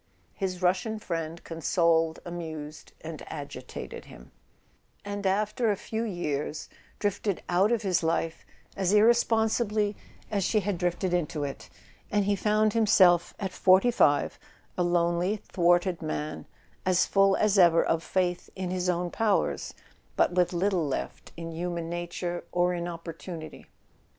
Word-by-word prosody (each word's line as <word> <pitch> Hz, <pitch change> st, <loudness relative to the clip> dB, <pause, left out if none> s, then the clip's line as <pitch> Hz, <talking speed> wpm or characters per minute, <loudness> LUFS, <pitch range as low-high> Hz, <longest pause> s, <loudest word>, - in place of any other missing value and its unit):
His 185 Hz, -2 st, -4 dB
Russian 185 Hz, +5 st, +1 dB
friend 165 Hz, -4 st, -4 dB
consoled, 165 Hz, -1 st, +1 dB
amused 160 Hz, -3 st, -7 dB
and 160 Hz, -1 st, -7 dB
agitated 145 Hz, -3 st, -7 dB
him, -, -, -14 dB, 0.7 s
and 205 Hz, -1 st, -3 dB
after 215 Hz, +4 st, +1 dB
a 205 Hz, -, +2 dB
few 220 Hz, +3 st, -4 dB
years 155 Hz, -8 st, -3 dB, 0.3 s
drifted 205 Hz, -1 st, -1 dB
out 185 Hz, +5 st, +3 dB
of 230 Hz, -2 st, +1 dB
his 185 Hz, -3 st, +1 dB
life 165 Hz, 0 st, -1 dB, 0.3 s
as 190 Hz, 0 st, +1 dB
irresponsibly 220 Hz, -1 st, +3 dB, 0.4 s
as 200 Hz, -2 st, 0 dB
she 215 Hz, +3 st, +2 dB
had 195 Hz, -2 st, -2 dB
drifted 180 Hz, 0 st, -1 dB
into 155 Hz, -3 st, -1 dB
it; 140 Hz, -1 st, -6 dB, 0.4 s
and 205 Hz, -1 st, +1 dB
he 205 Hz, 0 st, +2 dB
found 215 Hz, +1 st, +2 dB
himself, 185 Hz, -6 st, +4 dB
at 195 Hz, -2 st, -3 dB
forty 190 Hz, +7 st, +4 dB
five, 145 Hz, -11 st, +2 dB, 0.4 s
a -, -, -1 dB
lonely 175 Hz, +3 st, +1 dB
thwarted 175 Hz, -2 st, +1 dB
man, 155 Hz, -1 st, -4 dB, 0.4 s
as 185 Hz, -1 st, +3 dB
full 195 Hz, 0 st, +4 dB
as 210 Hz, -2 st, +3 dB
ever 170 Hz, -2 st, +6 dB
of 165 Hz, -, +1 dB
faith 180 Hz, 0 st, -1 dB
in 185 Hz, -1 st, -3 dB
his 180 Hz, 0 st, -1 dB
own 175 Hz, 0 st, -1 dB
powers, 220 Hz, -3 st, 0 dB, 0.4 s
but -, -, +3 dB
with 180 Hz, -1 st, +2 dB
little 180 Hz, -2 st, +1 dB
left 135 Hz, -, -5 dB
in 165 Hz, 0 st, -6 dB
human 170 Hz, 0 st, -4 dB
nature 175 Hz, 0 st, -4 dB
or 180 Hz, 0 st, +2 dB
in 175 Hz, 0 st, -3 dB
opportunity. 165 Hz, -1 st, -8 dB
180 Hz, 140 wpm, -28 LUFS, 170-200 Hz, 0.7 s, ever